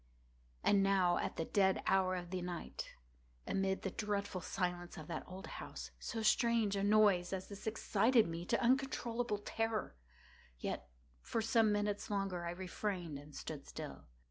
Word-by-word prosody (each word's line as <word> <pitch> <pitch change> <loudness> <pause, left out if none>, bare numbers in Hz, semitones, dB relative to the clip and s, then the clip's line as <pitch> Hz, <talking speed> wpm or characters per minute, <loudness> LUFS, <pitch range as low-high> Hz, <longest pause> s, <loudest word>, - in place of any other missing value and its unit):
And 200 -1 +5
now 190 -3 +4
at - - -2
the 165 - -1
dead 190 0 +3
hour 190 -1 +3
of 175 -1 -5
the 185 -1 -2
night, 175 -1 -5 0.5
amid 190 0 0
the 195 - -1
dreadful 205 -3 -2
silence 175 -2 -2
of 160 - -7
that - - -3
old 185 +1 -8
house, - - -7
so 225 -3 -3
strange 225 -2 +3
a 195 - 0
noise 205 -3 +5
as 190 -1 -3
this 205 +1 -8
excited 220 +1 +3
me 165 +1 -4
to - - +2
uncontrollable 245 -3 +1
terror. 220 - -2 0.6
Yet, - - -4 0.3
for 230 - -2
some 225 -2 +4
minutes 205 0 0
longer 195 -4 -1
I - - -1
refrained 180 -3 -3
and 145 +1 -13
stood - - -6
still. - - -7
195 Hz, 160 wpm, -36 LUFS, 180-215 Hz, 0.6 s, And